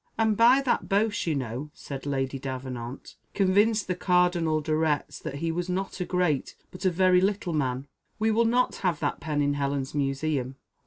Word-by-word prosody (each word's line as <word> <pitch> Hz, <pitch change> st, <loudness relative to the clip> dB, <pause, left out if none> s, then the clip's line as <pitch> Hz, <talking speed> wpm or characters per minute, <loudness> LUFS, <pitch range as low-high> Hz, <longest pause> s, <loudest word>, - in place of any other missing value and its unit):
"And 220 Hz, -1 st, +2 dB
by 240 Hz, +5 st, +6 dB
that 255 Hz, -, 0 dB
boast 205 Hz, -1 st, +1 dB
you 160 Hz, -, +1 dB
know," 130 Hz, +2 st, -4 dB
said 140 Hz, 0 st, -7 dB
Lady 135 Hz, -1 st, -1 dB
Davenant, 130 Hz, -2 st, -6 dB, 0.2 s
"convinced 205 Hz, +2 st, +3 dB
the 180 Hz, -, -1 dB
Cardinal 180 Hz, -3 st, +2 dB
de 155 Hz, 0 st, -1 dB
Retz 155 Hz, -3 st, 0 dB
that 155 Hz, -3 st, -6 dB
he 165 Hz, +3 st, -2 dB
was 175 Hz, +2 st, -3 dB
not 190 Hz, +2 st, -3 dB
a 180 Hz, -, -1 dB
great, 180 Hz, -7 st, 0 dB, 0.2 s
but 185 Hz, +2 st, -8 dB
a -, -, +6 dB
very 180 Hz, +1 st, +4 dB
little 195 Hz, -2 st, 0 dB
man. 130 Hz, -3 st, -1 dB, 0.3 s
We 220 Hz, 0 st, +2 dB
will 230 Hz, +2 st, +3 dB
not 245 Hz, +2 st, +2 dB
have 180 Hz, -3 st, 0 dB
that -, -, -1 dB
pen 150 Hz, -2 st, -1 dB
in 145 Hz, 0 st, +1 dB
Helen's 140 Hz, -1 st, -2 dB
museum." 135 Hz, -2 st, -1 dB
160 Hz, 190 wpm, -27 LUFS, 140-190 Hz, 0.3 s, by